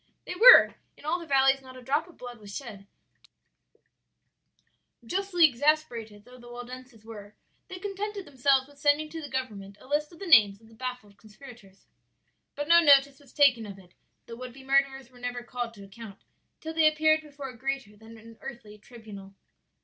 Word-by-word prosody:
"They -, -, -5 dB
were; 475 Hz, +7 st, +8 dB, 0.2 s
in -, -, -16 dB
all 335 Hz, +4 st, -1 dB
the 335 Hz, -, -10 dB
valleys 270 Hz, -1 st, +3 dB
not 260 Hz, -1 st, -13 dB
a -, -, -12 dB
drop 290 Hz, +6 st, -1 dB
of 350 Hz, -, -18 dB
blood 245 Hz, -2 st, -10 dB
was 205 Hz, -1 st, -11 dB
shed; 205 Hz, -7 st, -10 dB, 2.2 s
justly 360 Hz, +3 st, +2 dB
exasperated 240 Hz, -7 st, -1 dB
though 250 Hz, 0 st, -16 dB
the 240 Hz, 0 st, -14 dB
Waldenses 245 Hz, -1 st, -11 dB
were, 210 Hz, -2 st, -11 dB, 0.3 s
they 370 Hz, -, -8 dB
contented 405 Hz, +1 st, -6 dB
themselves 270 Hz, 0 st, +1 dB
with 285 Hz, 0 st, -20 dB
sending 295 Hz, +2 st, +1 dB
to 325 Hz, +1 st, -7 dB
the 290 Hz, -, -8 dB
government 210 Hz, -7 st, -6 dB
a -, -, -17 dB
list 295 Hz, +2 st, -1 dB
of 335 Hz, -, -15 dB
the 395 Hz, -, -8 dB
names 210 Hz, -, +5 dB
of 225 Hz, 0 st, -21 dB
the -, -, -19 dB
baffled 235 Hz, -4 st, -7 dB
conspirators. 215 Hz, -3 st, -16 dB, 0.7 s
"But 290 Hz, 0 st, -4 dB
no 340 Hz, +1 st, +7 dB
notice 280 Hz, -3 st, +4 dB
was 280 Hz, -3 st, -20 dB
taken 250 Hz, -7 st, +3 dB
of 200 Hz, -1 st, -10 dB
it; 180 Hz, -2 st, -19 dB, 0.3 s
the 230 Hz, -, -10 dB
would 250 Hz, 0 st, -9 dB
be 265 Hz, +1 st, -14 dB
murderers 270 Hz, -1 st, 0 dB
were 250 Hz, -, -18 dB
never 245 Hz, 0 st, -5 dB
called 240 Hz, -1 st, -6 dB
to 200 Hz, -, -13 dB
account 200 Hz, 0 st, -13 dB, 0.4 s
till 320 Hz, 0 st, -6 dB
they 320 Hz, -1 st, +4 dB
appeared 310 Hz, 0 st, +2 dB
before 285 Hz, -3 st, -9 dB
a 250 Hz, -, -12 dB
greater 265 Hz, -3 st, -5 dB
than 220 Hz, +2 st, -15 dB
an 225 Hz, +1 st, -16 dB
earthly 235 Hz, -6 st, -10 dB
tribunal. 205 Hz, -4 st, -13 dB
255 Hz, 190 wpm, -27 LUFS, 225-290 Hz, 2.2 s, were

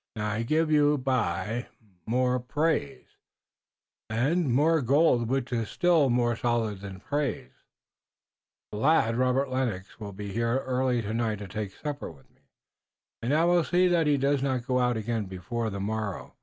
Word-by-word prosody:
Now 105 Hz, -1 st, -2 dB
I 110 Hz, +2 st, -1 dB
gif 155 Hz, +6 st, +1 dB
you 150 Hz, -1 st, +4 dB
by 125 Hz, -10 st, -1 dB
und 120 Hz, +3 st, -3 dB
by -, -, -30 dB, 0.4 s
more 125 Hz, +2 st, +1 dB
praise 145 Hz, +1 st, -1 dB, 1.0 s
und 135 Hz, +7 st, +1 dB
more 155 Hz, +5 st, +3 dB
gold 130 Hz, -2 st, +3 dB
which 130 Hz, 0 st, -1 dB
iss 115 Hz, -2 st, -1 dB
still 170 Hz, -6 st, +3 dB
more 120 Hz, -1 st, +2 dB
solid 115 Hz, -4 st, -1 dB
than 95 Hz, -1 st, -9 dB
praise. 145 Hz, -1 st, -2 dB, 1.2 s
The 105 Hz, -, -5 dB
lad, 130 Hz, -4 st, +3 dB
Robert 130 Hz, +2 st, +1 dB
Lennox, 115 Hz, -8 st, -3 dB
will 105 Hz, -2 st, -6 dB
be 100 Hz, +1 st, -6 dB
here 115 Hz, +4 st, 0 dB
early 125 Hz, -2 st, 0 dB
tonight 110 Hz, +1 st, -1 dB
to 100 Hz, 0 st, -8 dB
take 100 Hz, 0 st, -5 dB
supper 145 Hz, -1 st, -5 dB
with 70 Hz, -5 st, -16 dB
me, -, -, -34 dB, 0.8 s
und 120 Hz, +4 st, -1 dB
I 160 Hz, +3 st, +3 dB
will 175 Hz, -1 st, +4 dB
see 180 Hz, +3 st, +3 dB
that 170 Hz, -3 st, +2 dB
he 145 Hz, -1 st, +3 dB
does 140 Hz, 0 st, +1 dB
not 130 Hz, -3 st, -1 dB
go 125 Hz, 0 st, +1 dB
out 125 Hz, -2 st, +1 dB
again 110 Hz, -1 st, -2 dB
before 95 Hz, +5 st, -4 dB
the 100 Hz, -1 st, -5 dB
morrow. 105 Hz, -1 st, -4 dB
125 Hz, 170 wpm, -27 LUFS, 110-140 Hz, 1.2 s, you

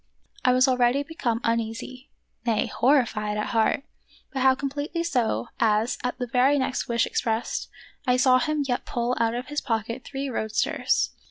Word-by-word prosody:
I 250 Hz, -, +5 dB
was 255 Hz, +2 st, +4 dB
already 255 Hz, +2 st, +3 dB
become 280 Hz, -8 st, -2 dB
uneasy, 230 Hz, +3 st, -3 dB, 0.3 s
nay, 230 Hz, -3 st, +1 dB
horrified 230 Hz, -6 st, +1 dB
at 210 Hz, -, -2 dB
heart, 230 Hz, +4 st, +2 dB, 0.5 s
but 265 Hz, -, -2 dB
how 260 Hz, 0 st, +5 dB
completely 285 Hz, +5 st, -3 dB
so, 245 Hz, -7 st, 0 dB
as, 220 Hz, +1 st, +2 dB
at 250 Hz, 0 st, -2 dB
the 250 Hz, -, -2 dB
very 255 Hz, +4 st, +3 dB
next 260 Hz, -1 st, -1 dB
wish 235 Hz, -1 st, +2 dB
expressed, 225 Hz, -1 st, -2 dB, 0.4 s
I 250 Hz, 0 st, +4 dB
saw 255 Hz, 0 st, +5 dB
him 305 Hz, -1 st, 0 dB
yet 245 Hz, -2 st, -1 dB
pull 240 Hz, +1 st, -1 dB
out 230 Hz, 0 st, +1 dB
of 245 Hz, +2 st, -3 dB
his 295 Hz, 0 st, -2 dB
pocket 230 Hz, +2 st, -2 dB
three 275 Hz, 0 st, -4 dB
roadsters. 215 Hz, -, 0 dB
250 Hz, 165 wpm, -25 LUFS, 230-270 Hz, 0.5 s, I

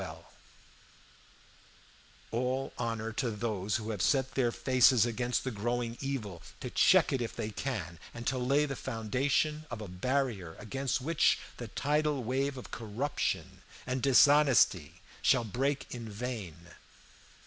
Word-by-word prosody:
"All 130 Hz, +3 st, -1 dB
honor 115 Hz, -2 st, -2 dB
to 120 Hz, +2 st, -1 dB
those 105 Hz, -2 st, -2 dB
who 110 Hz, 0 st, -2 dB
have 105 Hz, -4 st, -3 dB
set 130 Hz, +6 st, +2 dB
their 125 Hz, -3 st, +2 dB
faces 130 Hz, -2 st, +4 dB
against 120 Hz, +1 st, -1 dB
the 130 Hz, -, -2 dB
growing 120 Hz, +2 st, -2 dB
evil, 110 Hz, -11 st, -4 dB, 0.2 s
to -, -, -6 dB
check -, -, +5 dB
it 130 Hz, -, 0 dB
if 115 Hz, -, -4 dB
they 110 Hz, -, -3 dB
can, 100 Hz, -, -4 dB
and 120 Hz, 0 st, -8 dB
to 130 Hz, +1 st, 0 dB
lay 140 Hz, +4 st, +2 dB
the 135 Hz, -2 st, -4 dB
foundation 135 Hz, +7 st, -1 dB
of 120 Hz, -, -5 dB
a 105 Hz, -, -6 dB
barrier 100 Hz, -3 st, -2 dB
against 135 Hz, +4 st, -2 dB
which 165 Hz, +4 st, +3 dB, 0.2 s
the 120 Hz, -, -6 dB
tidal 150 Hz, +2 st, 0 dB
wave 135 Hz, +3 st, -1 dB
of 125 Hz, -, -9 dB
corruption 120 Hz, +6 st, -3 dB, 0.2 s
and 130 Hz, 0 st, -2 dB
dishonesty 135 Hz, -, +4 dB, 0.2 s
shall -, -, +4 dB
break 135 Hz, +6 st, -2 dB
in 115 Hz, -2 st, -6 dB
vain. 105 Hz, -6 st, -5 dB
125 Hz, 135 wpm, -31 LUFS, 110-135 Hz, 0.2 s, check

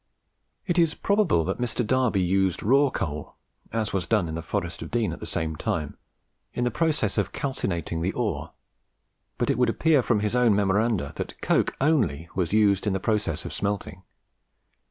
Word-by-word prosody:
It 175 Hz, -1 st, +1 dB
is 165 Hz, -2 st, +3 dB
probable 200 Hz, -, +2 dB
that 95 Hz, +7 st, -3 dB
Mr. 120 Hz, 0 st, -1 dB
Darby 125 Hz, -4 st, +2 dB
used 95 Hz, 0 st, +1 dB
raw 135 Hz, +6 st, +4 dB
coal, 75 Hz, -, -4 dB, 0.4 s
as 110 Hz, -1 st, -2 dB
was 95 Hz, -2 st, -1 dB
done 105 Hz, -6 st, +2 dB
in 80 Hz, -, -5 dB
the 85 Hz, -, -3 dB
Forest 85 Hz, 0 st, -3 dB
of -, -, -6 dB
Dean 115 Hz, -3 st, 0 dB
at -, -, -8 dB
the -, -, -6 dB
same 80 Hz, -1 st, -2 dB
time, 75 Hz, 0 st, -3 dB, 0.6 s
in 120 Hz, -, 0 dB
the 125 Hz, -, +1 dB
process 145 Hz, -8 st, +1 dB
of 100 Hz, -1 st, -1 dB
calcining 85 Hz, -, -2 dB
the 90 Hz, +3 st, 0 dB
ore; 85 Hz, -10 st, -2 dB, 0.9 s
but -, -, +1 dB
it -, -, -1 dB
would -, -, +4 dB
appear 160 Hz, -4 st, +3 dB
from 110 Hz, -3 st, +1 dB
his 105 Hz, +2 st, 0 dB
own 120 Hz, -4 st, +4 dB
Memoranda 100 Hz, -5 st, +1 dB
that -, -, -5 dB
coke -, -, +2 dB
only 105 Hz, -, +1 dB
was 90 Hz, -3 st, -1 dB
used 105 Hz, -1 st, +3 dB
in 100 Hz, -, +2 dB
the 95 Hz, -, 0 dB
process 105 Hz, -6 st, -1 dB
of -, -, -5 dB
smelting. 100 Hz, -4 st, -3 dB
105 Hz, 185 wpm, -26 LUFS, 85-120 Hz, 0.9 s, raw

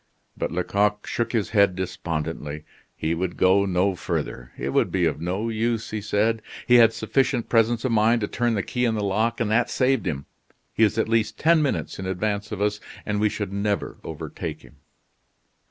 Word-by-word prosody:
But -, -, -3 dB
Lecoq 105 Hz, +4 st, 0 dB
shook 120 Hz, -, -2 dB
his 110 Hz, -5 st, -1 dB
head 100 Hz, -4 st, +4 dB
despondently. 80 Hz, -4 st, -4 dB, 0.3 s
He 80 Hz, +1 st, -1 dB
would 90 Hz, +1 st, -3 dB
go 100 Hz, +2 st, +4 dB
no 95 Hz, +1 st, +2 dB
further. 60 Hz, -7 st, -4 dB
"It -, -, -3 dB
would -, -, +1 dB
be 90 Hz, -2 st, +2 dB
of 80 Hz, -1 st, -1 dB
no 95 Hz, +6 st, -2 dB
use," 115 Hz, 0 st, -1 dB
he 110 Hz, -1 st, -3 dB
said. 110 Hz, +2 st, +1 dB, 0.2 s
"He 125 Hz, 0 st, +6 dB
had 115 Hz, -1 st, +7 dB
sufficient 125 Hz, +2 st, 0 dB
presence 115 Hz, +1 st, +2 dB
of 130 Hz, -, +1 dB
mind 115 Hz, +1 st, +3 dB
to 105 Hz, -, 0 dB
turn 120 Hz, +1 st, 0 dB
the 100 Hz, -, 0 dB
key 125 Hz, -, -2 dB
in 115 Hz, -2 st, +1 dB
the 105 Hz, -, -1 dB
lock, 110 Hz, +4 st, 0 dB
and 110 Hz, -3 st, 0 dB
that 120 Hz, +2 st, +3 dB
saved 130 Hz, -4 st, +1 dB
him. 70 Hz, -4 st, -3 dB, 0.5 s
He -, -, -2 dB
is 105 Hz, -, +3 dB
at 110 Hz, -, +1 dB
least 115 Hz, -1 st, +1 dB
ten 165 Hz, 0 st, +4 dB
minutes 145 Hz, -8 st, -2 dB
in 95 Hz, -, -4 dB
advance 100 Hz, +2 st, -2 dB
of 100 Hz, -1 st, -2 dB
us, 105 Hz, 0 st, 0 dB, 0.3 s
and 105 Hz, -1 st, -1 dB
we 105 Hz, 0 st, +3 dB
should 100 Hz, -2 st, -4 dB
never 100 Hz, 0 st, -1 dB
overtake 80 Hz, -2 st, -6 dB
him." -, -, -17 dB
105 Hz, 200 wpm, -24 LUFS, 95-115 Hz, 0.5 s, had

